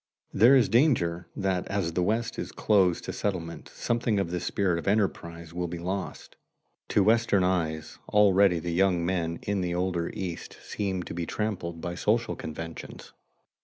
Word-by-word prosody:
There 120 +7 +6
is 130 -4 +5
danger 100 - +2
that 95 -2 -1
as 100 -5 -1
the 90 - 0
West 110 +5 -1
is - - -4
closed 95 -5 +2
to - - -5
settlement 85 -5 -4
something 115 -3 0
of 90 -4 -2
the 90 - -1
spirit 90 -1 0
of - - -8
enterprise 85 -5 -1
will 90 0 -2
be 85 +1 -5
lost. 90 -1 -5 0.5
To 105 - +3
Western 110 -2 +3
eyes 80 -4 -1
already 100 -3 +5
the 85 +1 -3
young 90 -1 +2
men 85 -2 -1
in 100 -1 -1
the 90 -1 -1
older 90 -2 -1
East 90 -3 -5
seem 95 -3 -3
to - - -7
be 85 -1 -3
trammeled 90 -6 -3
by 85 - -3
social 110 +6 0
conventions. 80 +1 -8
90 Hz, 165 wpm, -27 LUFS, 85-100 Hz, 0.5 s, There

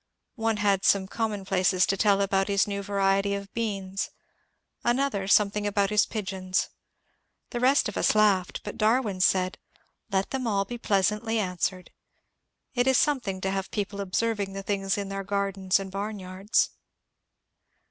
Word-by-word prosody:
One 225 -1 0
had 200 -2 +2
some 195 -1 +3
common 210 -2 -3
places 185 -1 +2
to 195 - 0
tell 200 0 +3
about 195 0 +1
his 200 -1 +2
new 200 -1 -3
variety 195 0 +1
of 200 0 -7
beans, 195 -4 -3 0.7
another 240 -5 0
some 200 0 +5
thing 205 0 -2
about 200 0 +1
his 210 0 +3
pigeons. 190 -3 -2 0.8
The 240 - -3
rest 265 +4 +4
of 210 - -6
us - - +2
laughed, 200 -4 +2
but 205 - -7
Darwin 215 -3 +2
said, 185 0 +2 0.2
^* - - -39 0.3
Let 195 0 0
them 260 -2 -2
all 200 -2 +1
be 240 +2 -7
pleasantly 210 +2 +1
answered. 185 -2 -2 0.8
It 245 0 +1
is 265 -1 +5
something 235 -11 0
to 190 - -1
have 195 -1 -3
people 200 -1 -3
observing 200 0 -1
the 195 0 -5
things 195 -1 -1
in 200 -1 -3
their 195 0 -4
gardens 195 -1 0
and 195 -1 -6
barnyards." 195 0 -1
200 Hz, 160 wpm, -27 LUFS, 195-215 Hz, 0.8 s, some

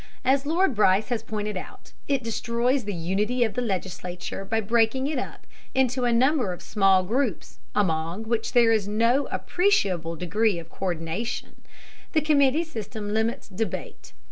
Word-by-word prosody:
As 270 +2 +3
Lord 335 0 +2
Bryce 205 -1 +3
has 240 -3 -1
pointed 210 -1 -4
out, 185 - -9
it 275 -3 +1
destroys 235 +2 0
the 205 - -3
unity 205 +9 0
of 220 - -1
the 250 - -1
legislature 185 -3 -4
by 220 +3 0
breaking 225 +4 +2
it 290 -2 -1
up - - -7 0.3
into 255 -1 +2
a 240 - +3
number 255 -2 +3
of 175 - -10
small 195 -3 +3
groups 230 - -2 0.2
among 170 0 0
which 225 0 -2
there 235 -2 +5
is 215 -3 +2
no 230 +6 +2
appreciable 190 - +1
degree 195 +4 +1
of 165 -1 -8
co÷rdination. 175 +5 -3 0.6
The 310 - +3
committee 295 0 +3
system 220 -8 -5
limits 220 +1 -1
debate. 205 - -5
225 Hz, 155 wpm, -25 LUFS, 195-255 Hz, 0.6 s, there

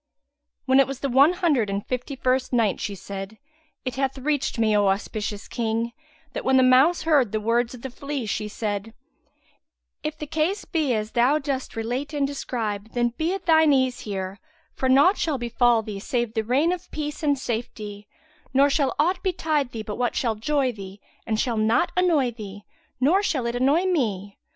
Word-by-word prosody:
When 265 0 +4
it 275 - +5
was 270 -1 -6
the 275 - -1
One 275 +7 +5
Hundred 305 - +1
and 200 +1 -3
Fifty 255 +2 -4
first 255 0 0
Night 230 -5 +2
She 205 -2 -3
said, 195 +3 -7 0.5
It 255 0 -3
hath 270 0 -1
reached 280 0 -1
me, 220 -2 +2
O 205 -1 +3
auspicious 205 +1 -2
King, 230 0 -1 0.4
that - - -4
when 265 0 +3
the 260 - +6
mouse 260 +7 +5
heard 290 -9 +3
the 215 - 0
words 235 +3 0
of 235 - -14
the 265 - -5
flea, 280 -1 -4
she 210 0 -2
said, 210 0 -4 1.1
"If 305 0 -4
the 300 - -5
case 320 +7 -1
be 300 -7 0
as 215 0 -3
thou 250 +5 +3
dost 275 -4 -3
relate 250 +7 -3
and 285 -1 +1
describe, 225 -6 -4
then 240 -1 +2
be 315 +8 -2
at 390 - -8
thine 315 -3 +5
ease 260 -2 +1
here; 195 -1 -5 0.3
for 260 - -1
naught 285 +10 +5
shall 315 -5 0
befal 240 -1 +2
thee 205 -2 -6
save 240 0 -2
the 220 - 0
rain 270 +9 +2
of 360 0 -5
peace 300 +1 -5
and 290 -2 +2
safety; 220 -4 -5 0.5
nor 280 +1 +5
shall 275 -2 +1
aught 355 +5 +1
betide 315 -7 0
thee 225 -2 -5
but 210 -1 -5
what 245 -1 0
shall 235 -3 +1
joy 265 +4 0
thee 195 -2 -10 0.3
and 220 -1 0
shall 235 -2 0
not 220 +10 +2
annoy 330 -9 +3
thee, 205 -3 -9 0.4
nor 320 +10 +4
shall 285 -11 -1
it 235 0 -2
annoy 280 +8 +3
me. 210 - -1
255 Hz, 195 wpm, -24 LUFS, 220-290 Hz, 1.1 s, the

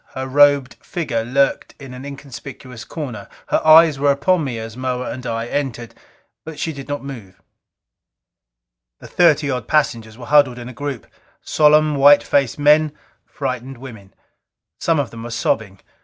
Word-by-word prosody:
Her 130 0 -4
robed 145 -1 +3
figure 135 -10 -3
lurked 135 +4 0
in 135 -3 -10
an 125 +2 -9
inconspicuous 135 -3 -10
corner; 125 -10 -7 0.2
her - - +1
eyes 155 -2 +6
were 145 0 +2
upon 155 +5 +2
me 130 -5 -4
as 115 0 -7
Moa 125 0 -3
and 125 0 -7
I 115 0 -3
entered, 120 -3 -4 0.5
but 160 -1 -9
she 160 - -3
did 140 -1 -9
not 145 -1 -4
move. 115 -10 -10 1.6
The - - -14
thirty 155 -5 +3
odd 125 -4 -4
passengers 115 -7 0
were 125 - -10
huddled 145 -4 +3
in 120 0 -8
a - - -10
group. 140 -2 -6 0.4
Solemn, 150 0 +3
white 145 +1 +6
faced 140 -1 0
men; 150 +1 +3 0.3
frightened 130 -1 -5
women. 110 -7 -12 0.7
Some 165 -2 +1
of 135 -5 -2
them 115 - -9
were 120 - -7
sobbing. 110 -4 -2
135 Hz, 160 wpm, -19 LUFS, 120-145 Hz, 1.6 s, eyes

